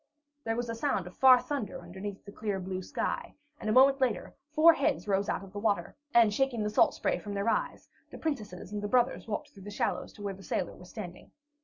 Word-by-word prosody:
There 225 0 0
was 240 +1 -2
a 230 - -3
sound 230 -6 -1
of 180 - -10
far 260 -1 +8
thunder 275 -7 -4
under 175 +2 -11
the 200 0 -6
clear 205 -2 -3
blue 185 0 -4
sky, - - -3 0.2
and 215 - -3
a - - +3
moment 270 +3 +6
later, 235 -8 0 0.2
four 310 +2 +7
heads 305 -7 0
rose 200 0 +1
out - - -1
of 195 -1 -12
the 205 - -4
waters, 205 -5 0 0.2
and 230 -4 +5
shaking 250 -2 +1
the 210 - -1
salt - - +4
spray - - 0
from 205 -1 -6
their 200 +2 -1
eyes, - - -1 0.2
the - - -9
princesses 210 - -4
and 210 -1 -3
the 205 - -2
brothers 245 +3 +1
walked 210 - -3
through 195 - -15
the 200 - -8
shallows 205 - -2
to 205 - -11
where 200 -1 -2
the 190 - -13
sailor 190 - -2
was 180 0 -14
standing. 180 -5 -8
210 Hz, 235 wpm, -30 LUFS, 195-245 Hz, 0.2 s, far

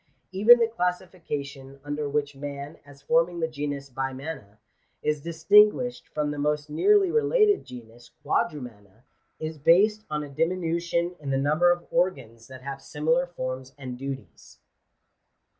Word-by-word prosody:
Even 210 +6 +7
the 230 -1 +2
classification 160 -9 -4
under 145 0 -3
which 145 0 -1
man, 140 +2 -7
as 140 -1 -16
forming 165 +2 +2
the 160 - 0
genus 145 -2 -5
Bimana, 135 -4 -6 0.5
is 150 -1 0
distinguished 210 - +3
from 150 -1 -2
the 145 - -5
most 150 +1 -1
nearly 395 - +4
related 435 -2 +3
genus 120 -1 -12 0.2
Quadrumana, 115 - -3 0.4
is 155 -1 -5
based 205 +8 +4
on 150 0 -2
a - - -7
dimi 165 +6 0
nution 170 +1 -1
in 145 -2 -6
the 135 - +1
number 155 +6 +3
of 175 0 -2
organs 130 -11 -1
that 130 -1 -12
have 135 0 -6
similar 160 +5 0
forms 130 -5 -6
and 130 -3 -7
duties. 135 +1 -8
150 Hz, 140 wpm, -26 LUFS, 135-175 Hz, 0.5 s, Even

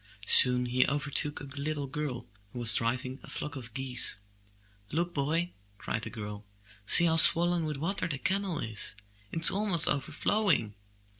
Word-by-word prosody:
Soon 125 +2 +6
he 125 +1 0
overtook 145 +1 -2
a - - -11
little 140 +1 -5
girl 140 -2 -6 0.2
who 115 - -12
was 120 -2 +6
driving 130 +3 -2
a - - -15
flock 150 -1 -6
of 120 -4 -8
geese. 130 -5 0 0.7
''Look, 170 +3 -3
boy! 160 +5 -2 0.3
cried 110 - -5
the 115 - -8
girl. 105 -2 -9 0.4
''See 175 - +6
how 165 -1 +1
swollen 170 +1 +5
with 150 -2 -5
water 180 +8 -3
the 150 -4 -5
canal 190 +4 -3
is! 110 -4 -5 0.4
It 165 - -5
is 165 - +9
almost 195 -5 +2
overflowing. 155 - -1
145 Hz, 160 wpm, -28 LUFS, 125-165 Hz, 0.7 s, is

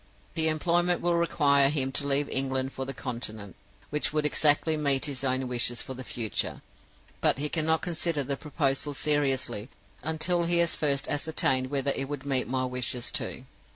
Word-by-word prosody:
The 160 -1 +1
employment 175 +3 +2
will 175 0 +1
require 145 -5 +4
him 135 -3 -1
to 140 +2 -2
leave 140 +1 +2
England 135 0 -1
for 135 - -4
the 135 - -4
Continent, 110 -5 -5 0.4
which 150 0 +1
would 150 0 0
exactly 150 +1 +4
meet 140 -3 +2
his 140 -3 -3
own 130 0 0
wishes 120 -1 -1
for 130 - -7
the 130 0 -7
future, 115 -3 -3 0.6
but - - +3
he 150 +2 -2
cannot 160 0 +1
consider 170 -3 -1
the 140 +1 -2
proposal 145 -1 -1
seriously 135 -6 0 0.3
until 170 +2 0
he 170 0 +1
has 170 -1 +2
first 140 -2 +1
ascertained 140 -4 +1
whether 140 0 +1
it 135 0 -3
would 145 -1 -5
meet 135 -2 +1
my 130 +1 0
wishes 125 -1 -1
too. - - -3
140 Hz, 175 wpm, -28 LUFS, 130-155 Hz, 0.6 s, require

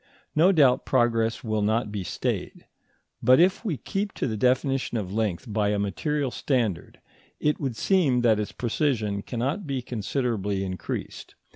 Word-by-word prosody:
No 170 +5 +5
doubt 135 -8 +4
progress 115 -3 +1
will 110 -2 -1
not 110 +1 0
be 100 -2 -3
stayed; - - -3 0.6
but 130 +1 +6
if 185 +5 +3
we 185 - -2
keep 200 +6 -3
to - - -2
the 110 - -2
definition 130 +2 +1
of 95 -3 -4
length 110 -1 -1
by 105 -1 +1
a 105 - +1
material 135 +7 -1
standard, 120 - -1 0.4
it 150 0 +1
would 135 -5 -2
seem 140 - +2
that 110 -3 +3
its 105 - -3
precision 115 -5 -1
cannot 135 - -3
be 135 -3 -2
considerably 105 -4 -2
increased. 95 -2 -5
120 Hz, 155 wpm, -26 LUFS, 105-140 Hz, 0.6 s, but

